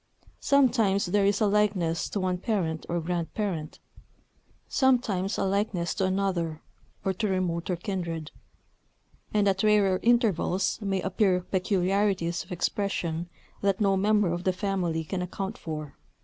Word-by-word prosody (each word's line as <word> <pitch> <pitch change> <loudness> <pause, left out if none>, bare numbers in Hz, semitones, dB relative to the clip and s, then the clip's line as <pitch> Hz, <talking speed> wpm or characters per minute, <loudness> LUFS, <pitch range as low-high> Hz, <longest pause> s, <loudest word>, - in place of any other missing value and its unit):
Sometimes 230 -8 +3
there 195 +2 +2
is 200 +1 +1
a - - +5
likeness 200 -5 +1
to 205 - -2
one 185 -1 -1
parent 175 -7 -2
or 175 - 0
grandparent; 170 0 -3 0.9
sometimes 225 -8 +1
a - - 0
likeness 195 -3 0
to 190 - 0
another, 185 -5 -1 0.4
or 190 - +1
to 210 +4 -1
remoter 180 -2 -1
kindred; 170 -4 -4 1.0
and 205 -1 +2
at 195 -1 +2
rarer 205 -3 +3
intervals 215 -6 +2
may 195 -2 -1
appear 190 -1 +2
peculiarities 185 -1 0
of 175 - -18
expression 175 -2 -2 0.3
that 200 -1 +1
no 200 -2 +3
member 205 -2 +2
of 175 +1 -4
the 185 - +1
family 180 -4 -1
can 180 +4 -3
account 190 +3 -4
for. 155 -3 -6
190 Hz, 135 wpm, -27 LUFS, 175-205 Hz, 1.0 s, a